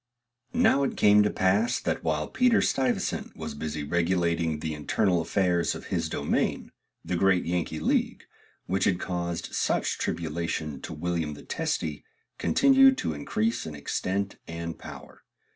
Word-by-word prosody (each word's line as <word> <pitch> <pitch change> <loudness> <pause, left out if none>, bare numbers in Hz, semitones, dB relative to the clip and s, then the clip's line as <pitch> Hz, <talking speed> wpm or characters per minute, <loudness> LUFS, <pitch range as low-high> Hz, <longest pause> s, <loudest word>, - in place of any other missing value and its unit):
Now 225 - +4
it 140 - -1
came 105 0 +6
to 105 - +3
pass, 100 +6 +2
that - - -2
while 75 -1 0
Peter 250 -2 +3
Stuyvesant 130 -2 0
was 80 -1 -5
busy 75 0 -4
regulating 85 0 +1
the 80 +1 -4
internal 85 +4 +1
affairs 90 0 +1
of - - -9
his - - 0
domain, - - -1 0.3
the 90 - -1
great 95 0 +3
Yankee 85 -2 -2
league, 80 - 0 0.4
which 95 +1 0
had 90 -2 +2
caused 85 -2 -3
such - - 0
tribulation 80 -3 -3
to - - -6
William 80 -1 -2
the - - -12
Testy, 75 -2 -2 0.4
continued 270 -1 +5
to 80 - -2
increase 110 +11 -1
in 75 - -6
extent 95 +7 -2
and 85 0 -5
power. - - -11
85 Hz, 145 wpm, -27 LUFS, 80-100 Hz, 0.4 s, came